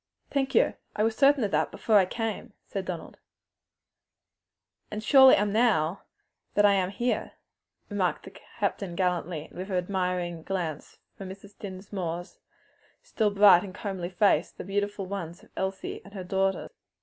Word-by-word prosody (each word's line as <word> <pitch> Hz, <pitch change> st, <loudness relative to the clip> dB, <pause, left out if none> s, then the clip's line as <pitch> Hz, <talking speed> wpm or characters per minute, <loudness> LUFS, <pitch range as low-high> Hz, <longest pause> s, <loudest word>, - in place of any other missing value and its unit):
"Thank 270 Hz, -1 st, 0 dB
you, -, -, +4 dB, 0.2 s
I 210 Hz, -, +1 dB
was 225 Hz, 0 st, +1 dB
certain 280 Hz, -1 st, +4 dB
of 205 Hz, -, -1 dB
that -, -, +1 dB
before 220 Hz, -2 st, +2 dB
I 185 Hz, -, +3 dB
came," 225 Hz, +1 st, -4 dB
said 195 Hz, -1 st, -4 dB
Donald. 175 Hz, -3 st, -6 dB, 1.7 s
"And 210 Hz, -, -5 dB
I 215 Hz, -, -9 dB
surely 265 Hz, 0 st, +8 dB
am 205 Hz, 0 st, 0 dB
now 200 Hz, -7 st, +2 dB, 0.5 s
that 205 Hz, -, +5 dB
I 205 Hz, -, +6 dB
am 185 Hz, -2 st, +1 dB
here," 240 Hz, +5 st, -2 dB, 0.5 s
remarked -, -, -1 dB
the -, -, -10 dB
captain 180 Hz, -4 st, -4 dB
gallantly, 180 Hz, -4 st, -1 dB
and -, -, -17 dB
with 190 Hz, +2 st, -5 dB
an 185 Hz, -, 0 dB
admiring 180 Hz, -2 st, -2 dB
glance 165 Hz, -4 st, -4 dB, 0.2 s
from 195 Hz, -1 st, -8 dB
Mrs. 195 Hz, +2 st, -11 dB
Dinsmore's 185 Hz, -3 st, -6 dB, 0.6 s
still 225 Hz, -, 0 dB
fresh, 200 Hz, -, -9 dB
bright, 195 Hz, -3 st, +8 dB
and 190 Hz, -2 st, -8 dB
comely 190 Hz, -5 st, -4 dB
face 195 Hz, +3 st, +3 dB
to -, -, -38 dB
the -, -, -6 dB
more -, -, -13 dB
beautiful 205 Hz, 0 st, -1 dB
ones 180 Hz, -3 st, -6 dB
of -, -, -19 dB
Elsie 190 Hz, 0 st, -3 dB
and 200 Hz, +1 st, -14 dB
her 190 Hz, -, -5 dB
daughter. 190 Hz, +1 st, -1 dB
195 Hz, 175 wpm, -28 LUFS, 180-210 Hz, 1.7 s, surely